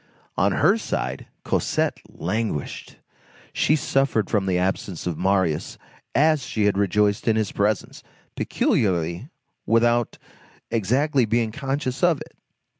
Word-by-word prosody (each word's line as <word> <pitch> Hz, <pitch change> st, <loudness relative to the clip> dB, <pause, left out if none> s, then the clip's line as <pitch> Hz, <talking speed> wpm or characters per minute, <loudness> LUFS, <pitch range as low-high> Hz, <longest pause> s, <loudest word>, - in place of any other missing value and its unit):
On -, -, +2 dB
her -, -, +3 dB
side, -, -, -3 dB, 0.2 s
Cosette -, -, 0 dB
languished. 100 Hz, -4 st, -3 dB, 0.6 s
She 155 Hz, -, +3 dB
suffered 135 Hz, -8 st, 0 dB
from 100 Hz, -4 st, +1 dB
the 90 Hz, -1 st, +2 dB
absence 95 Hz, -1 st, -2 dB
of 90 Hz, -2 st, -1 dB
Marius 95 Hz, -4 st, 0 dB, 0.4 s
as 155 Hz, +1 st, +4 dB
she 110 Hz, -4 st, -1 dB
had 105 Hz, -, +2 dB
rejoiced 100 Hz, +2 st, +1 dB
in 110 Hz, -, +4 dB
his 110 Hz, -2 st, 0 dB
presence, 105 Hz, 0 st, -1 dB, 0.3 s
peculiarly, 85 Hz, -, 0 dB, 0.4 s
without 120 Hz, +1 st, +2 dB, 0.5 s
exactly 130 Hz, +5 st, +2 dB
being 115 Hz, 0 st, 0 dB
conscious 135 Hz, 0 st, -3 dB
of 175 Hz, -5 st, +3 dB
it. -, -, -11 dB
110 Hz, 120 wpm, -23 LUFS, 95-130 Hz, 0.6 s, as